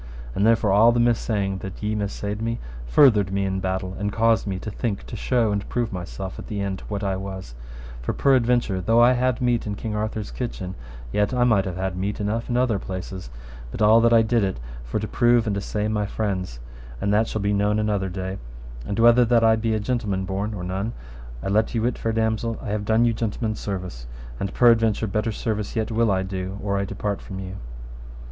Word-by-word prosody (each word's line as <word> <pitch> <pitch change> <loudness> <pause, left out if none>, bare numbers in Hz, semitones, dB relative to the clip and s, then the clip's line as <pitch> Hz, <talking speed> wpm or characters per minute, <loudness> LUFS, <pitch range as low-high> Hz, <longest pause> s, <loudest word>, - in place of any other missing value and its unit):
And 100 +8 +2
therefore 115 -3 +3
all 110 +4 +6
the 120 - +1
missaying 105 -5 +1
that 95 +2 -8
ye 105 +1 0
missaid 105 0 -3
me 115 +1 -1 0.3
furthered 105 - +5
me 100 0 0
in 95 0 -1
my - - -2
battle, 95 0 -2
and 105 0 -1
caused 115 0 +2
me 95 -2 -2
to 105 +3 -6
think 100 -1 -3
to - - -7
show 115 -1 +1
and 100 -1 -2
prove 120 -4 -1
myself 95 +1 -6
at - - -8
the 105 - -4
end 100 -1 -3
what 105 -1 -3
I 95 -1 0
was; 95 -8 -6 0.5
for - - -1
peradventure 120 -7 +2
though 115 +5 +3
I 120 +1 +7
had 125 0 0
meat 120 -3 +1
in 105 - -2
King 110 +1 -4
Arthur's 105 0 -3
kitchen, 95 -7 -4 0.4
yet 105 +4 +1
I 125 - +3
might 110 -6 +3
have 95 -2 -4
had 95 0 -2
meat 100 +3 -2
enough 110 +3 -2
in 120 - +1
other 125 -5 +2
places, 95 -5 -6 0.4
but - - -7
all 110 +2 +7
that 115 0 +4
I 115 -1 +6
did 115 0 +2
it 95 -10 -1 0.2
for - - -3
to 110 - -3
prove 120 -1 +3
and 105 -2 0
assay 105 +1 -2
my 105 -1 0
friends, 95 - -3 0.4
and 100 - 0
that 110 +2 +3
shall 110 - -3
be 100 +1 +1
known 105 +1 +2
another 105 -3 0
day; 95 +1 -4 0.5
and 100 - -3
whether 120 +1 +6
that 115 0 +3
I 110 0 +6
be 110 0 0
a - - 0
gentleman 105 -4 -1
born 100 +3 -2
or 90 - -5
none, 95 +5 -3 0.5
I - - -3
let 110 +4 +1
you 110 - +1
wit, 120 0 0
fair 115 - -1
damosel, 110 0 0
I - - -6
have 105 0 -2
done 110 +2 +3
you 115 - +2
gentleman's 110 -1 -2
service, 90 -12 -5 0.3
and 100 - -2
peradventure 115 -2 +4
better 105 +2 -1
service 105 -1 -3
yet 110 0 -1
will 115 0 +2
I 95 -1 +1
do 95 0 -4
or 100 -1 0
I 100 - -1
depart 100 +1 -3
from 95 - -8
you. 95 0 -6
105 Hz, 220 wpm, -24 LUFS, 95-115 Hz, 0.5 s, I